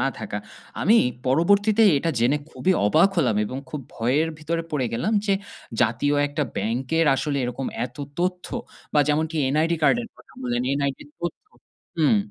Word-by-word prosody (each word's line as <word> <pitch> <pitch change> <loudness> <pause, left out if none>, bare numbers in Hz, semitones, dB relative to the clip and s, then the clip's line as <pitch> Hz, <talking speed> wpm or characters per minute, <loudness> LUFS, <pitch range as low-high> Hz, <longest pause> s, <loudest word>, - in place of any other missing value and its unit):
না - - +2
থাকা। - - -4 0.4
আমি 230 - +5 0.3
পরবর্তীতে 200 - +3 0.2
এটা 165 +3 0
জেনে 125 +6 +3
খুবই 190 +3 +1
অবাক 160 - +5
হলাম 125 -10 +2
এবং 130 +5 -5
খুব 150 - -4
ভয়ের 135 +8 +1
ভিতরে 165 +2 -2
পড়ে 135 -5 0
গেলাম 170 - -1
যে, 200 - +3 0.5
জাতীয় 120 +5 +1
১ 145 - -9
টা 150 - +3
ব্যাংকের 130 +10 0
আসলে 145 -1 -1
এরকম 125 +2 -3 0.2
এত 125 - -19 0.2
তথ্য 180 0 -1 0.5
বা 150 - +6
যেমন 150 +2 +2
টি 165 - -5 0.2
NID 165 +2 +2
কার্ডের 230 +11 +3
কথা - - -19
বললেন 120 0 -1 0.2
NID 140 -1 -1
র - - -25
তথ্য 175 - -4 0.5
হুম। 160 +7 +4
150 Hz, 170 wpm, -24 LUFS, 125-170 Hz, 0.5 s, বা